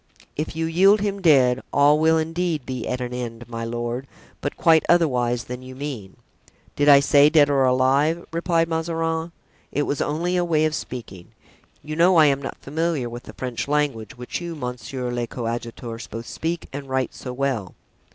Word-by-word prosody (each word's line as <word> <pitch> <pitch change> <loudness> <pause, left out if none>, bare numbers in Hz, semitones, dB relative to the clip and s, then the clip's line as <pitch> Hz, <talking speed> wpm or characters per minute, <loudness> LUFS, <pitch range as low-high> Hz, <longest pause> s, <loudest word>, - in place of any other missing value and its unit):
"If 155 +1 -4
you 165 0 -1
yield 195 +5 +4
him 200 -1 -2
dead, 130 -7 +4
all 145 +2 +4
will 160 +1 +4
indeed 165 -2 -1
be 130 -3 -4
at 125 0 -2
an 125 0 -4
end, 120 -1 -6
my 115 -1 -5
lord, 120 +3 -4 0.3
but 145 - -3
quite 160 -1 +5
otherwise 125 -8 +2
than 125 0 -7
you 130 0 -10
mean." 130 -9 -6 0.6
"Did 145 0 +3
I 140 -1 +9
say 145 +1 +5
'dead 150 -2 +5
or 135 -2 +3
alive?'" 135 +6 +2
replied 165 0 +1
Mazarin. 165 0 -2 0.4
"It 145 - 0
was 145 - -2
only 170 +5 -1
a 175 - +2
way 155 -3 +2
of 155 - 0
speaking. 105 - -7 0.6
You 155 0 -5
know 175 +3 +4
I 160 -2 +7
am 140 -1 +2
not 135 - -6
familiar 155 -3 -2
with 120 +1 -7
the - - -10
French 125 -1 -4
language, 140 -5 -1
which 125 +7 -5
you, 170 -1 -5
monsieur 125 -1 -5
le 120 -1 -2
coadjuteur, 115 0 -5
both 115 +2 -6
speak 165 +6 -4
and 140 -1 -6
write 130 -2 -1
so 125 - -7
well." 125 -7 -2
140 Hz, 185 wpm, -23 LUFS, 125-160 Hz, 0.6 s, I